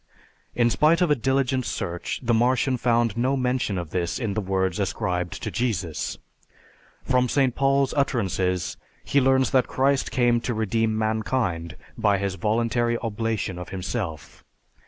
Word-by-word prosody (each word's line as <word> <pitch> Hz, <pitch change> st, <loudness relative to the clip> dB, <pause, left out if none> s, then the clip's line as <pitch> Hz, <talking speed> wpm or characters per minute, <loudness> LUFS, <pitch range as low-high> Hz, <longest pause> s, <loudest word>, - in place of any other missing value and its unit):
In 120 Hz, -1 st, +3 dB
spite 155 Hz, +6 st, +4 dB
of 175 Hz, -4 st, +3 dB
a -, -, +5 dB
diligent 130 Hz, 0 st, 0 dB
search 85 Hz, -6 st, -4 dB
the 120 Hz, -1 st, +1 dB
Martian 125 Hz, +3 st, +2 dB
found 120 Hz, -2 st, +1 dB
no 130 Hz, +4 st, +1 dB
mention 125 Hz, -6 st, 0 dB
of 85 Hz, -3 st, -5 dB
this 85 Hz, -2 st, -1 dB
in 110 Hz, -5 st, -2 dB
the 110 Hz, -, -1 dB
words 95 Hz, -1 st, -1 dB
ascribed 90 Hz, -3 st, -2 dB
to -, -, -3 dB
Jesus. 95 Hz, -10 st, -2 dB, 0.9 s
From 125 Hz, -1 st, +2 dB
St. 135 Hz, -2 st, +2 dB
Paul's 135 Hz, 0 st, +2 dB
utterances 95 Hz, -, 0 dB, 0.3 s
he 140 Hz, -, +2 dB
learns 130 Hz, 0 st, +3 dB
that 130 Hz, -2 st, +3 dB
Christ 135 Hz, +1 st, +1 dB
came 120 Hz, -2 st, +2 dB
to 120 Hz, -1 st, -2 dB
redeem 110 Hz, +1 st, 0 dB
mankind 110 Hz, -7 st, -1 dB, 0.2 s
by 100 Hz, -1 st, +3 dB
his 100 Hz, -1 st, -2 dB
voluntary 115 Hz, +3 st, 0 dB
oblation 110 Hz, -4 st, -2 dB
of 90 Hz, 0 st, -7 dB
himself. 95 Hz, -, -5 dB
115 Hz, 150 wpm, -24 LUFS, 95-130 Hz, 0.9 s, a